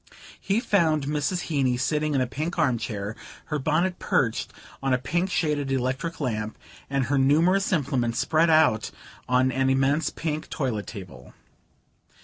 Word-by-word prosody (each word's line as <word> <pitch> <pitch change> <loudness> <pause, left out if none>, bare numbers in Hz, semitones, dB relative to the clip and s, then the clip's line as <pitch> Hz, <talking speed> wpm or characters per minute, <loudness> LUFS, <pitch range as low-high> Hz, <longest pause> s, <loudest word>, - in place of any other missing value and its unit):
He 200 +3 0
found 160 - +2
Mrs. 150 +5 -1
Heeny 135 -6 0
sitting 150 +3 0
in 135 - +2
a - - +2
pink 155 +8 -4
arm 130 -8 +2
chair, 105 -2 -4 0.3
her 150 -1 -2
bonnet 170 +6 0
perched 115 -4 0 0.3
on 135 -1 +2
a - - +1
pink 170 +9 -1
shaded 150 -6 0
electric 135 +6 -2
lamp 110 -6 -3 0.3
and 135 -1 0
her 140 +1 +1
numerous 165 +9 +3
implements 130 -8 0
spread 160 +4 +2
out 155 -9 +4 0.4
on 125 +1 +3
an 130 +1 +1
immense 135 +4 +2
pink 155 -1 -4
toilet 120 -8 -2
table. 85 - -10
140 Hz, 150 wpm, -25 LUFS, 125-160 Hz, 0.4 s, out